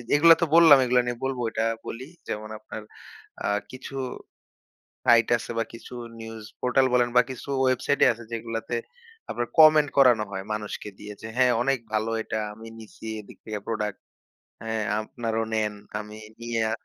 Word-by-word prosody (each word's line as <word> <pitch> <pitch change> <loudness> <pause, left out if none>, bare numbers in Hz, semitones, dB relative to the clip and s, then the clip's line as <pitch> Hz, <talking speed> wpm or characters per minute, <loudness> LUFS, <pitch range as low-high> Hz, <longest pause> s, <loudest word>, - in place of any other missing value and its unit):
এগুলা 165 +2 +8
তো - - +4
বললাম, 160 -4 +9
এগুলা 125 0 +4
নিয়ে 120 -1 -2
বলবো 130 -2 -2
এটা 110 - -1 0.2
বলি। 130 +4 -6 0.2
যেমন 110 0 -4
আপনার 110 0 -8 0.6
আ - - +1 0.2
কিছু 130 +1 -9 1.1
সাইট 115 -1 +6
আছে 120 - -7
বা - - +2
কিছু 115 - -11 0.3
নিউজ 115 -1 -8 0.2
পোর্টাল 125 +1 +3
বলেন 120 -1 +4
বা - - +9
কিছু 130 +2 -9
ওয়েবসাইটই 130 +2 +3
আছে 115 +1 -12
যেগুলাতে 115 +1 -3 0.5
আপনার 120 0 -2
কমেন্ট 155 -1 +8
করানো 125 -5 +6
হয় 95 0 -4
মানুষকে 105 0 -5
দিয়ে 105 0 -8
যে, 110 - -6
হ্যাঁ, 125 -1 +5
অনেক 135 -1 +1
ভালো 110 +1 0
এটা 110 - -3
আমি 110 +2 -11
নিছি 110 0 -13 0.2
এদিক 105 - -15
থেকে 105 -2 -4
প্রোডাক্ট। 105 -3 -2 0.7
হ্যাঁ, 110 -1 -1 0.2
আপনারাও 115 0 -2
নেন। 105 -1 0 0.3
আমি 105 0 -9 0.2
নিয়া 115 -2 -1
115 Hz, 160 wpm, -26 LUFS, 110-130 Hz, 1.1 s, বললাম